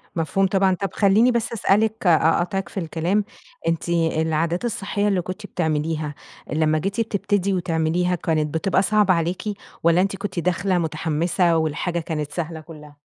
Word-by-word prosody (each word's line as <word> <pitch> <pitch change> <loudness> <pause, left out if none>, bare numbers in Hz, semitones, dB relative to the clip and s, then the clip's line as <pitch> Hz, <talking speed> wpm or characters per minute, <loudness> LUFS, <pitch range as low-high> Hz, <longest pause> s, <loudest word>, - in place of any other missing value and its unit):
مفهوم 185 +4 +1
طبعًا. 190 -1 +2
طب 195 +2 -3
خلّيني 215 +5 +4
بس 235 -1 -1
أسألِك 215 -1 +1
أقاطعِك 175 +4 +2
في 195 - -4
الكلام، 170 +5 0 0.4
أنتِ 165 0 -1
العادات 165 +2 0
الصحية 205 -2 -1
اللي 190 -3 +1
كنتِ 185 +4 -7
بتعمليها، 155 -3 -2 0.4
لمّا 155 0 +2
جيتي 200 +6 -1
بتبتدي 200 -2 0
وتعمليها 175 0 0
كانت 155 -2 -1
بتبقى 190 +3 +1
صعبة 210 -1 +3
عليكِ، 170 +1 -1 0.4
والّا 170 +2 +4
أنتِ 195 0 0
كنتِ 190 -3 -4
داخلة 180 +2 0
مُتحمسة 165 +2 +1
والحاجة 160 +2 -1
كانت 150 -3 -4
سهلة 165 -2 -4
كلّها؟ 150 -2 -13
175 Hz, 145 wpm, -22 LUFS, 160-195 Hz, 0.4 s, خلّيني